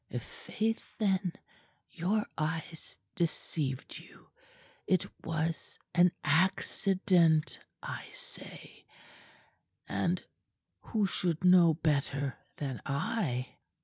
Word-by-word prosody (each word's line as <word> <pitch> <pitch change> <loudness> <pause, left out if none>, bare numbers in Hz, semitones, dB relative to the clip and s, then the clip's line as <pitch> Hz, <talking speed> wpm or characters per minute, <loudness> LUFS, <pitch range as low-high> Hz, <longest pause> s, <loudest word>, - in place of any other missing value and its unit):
"I'faith, 235 - -3
then, 190 -4 +1 0.6
your 195 +5 0
eyes 160 +1 -3 0.2
deceived 150 -5 -2
you. - - -17 0.6
It 185 -2 +3 0.2
was 165 0 -2 0.2
an 175 0 +6
accident, 175 0 +3 0.2
I - - -5
say - - -9 1.0
and - - 0 0.6
who 215 -4 0
should 175 -2 -1
know 180 -3 +7
better 140 -3 0 0.2
than 135 -4 -3
I?" 140 - -1
165 Hz, 80 wpm, -32 LUFS, 155-190 Hz, 1.0 s, know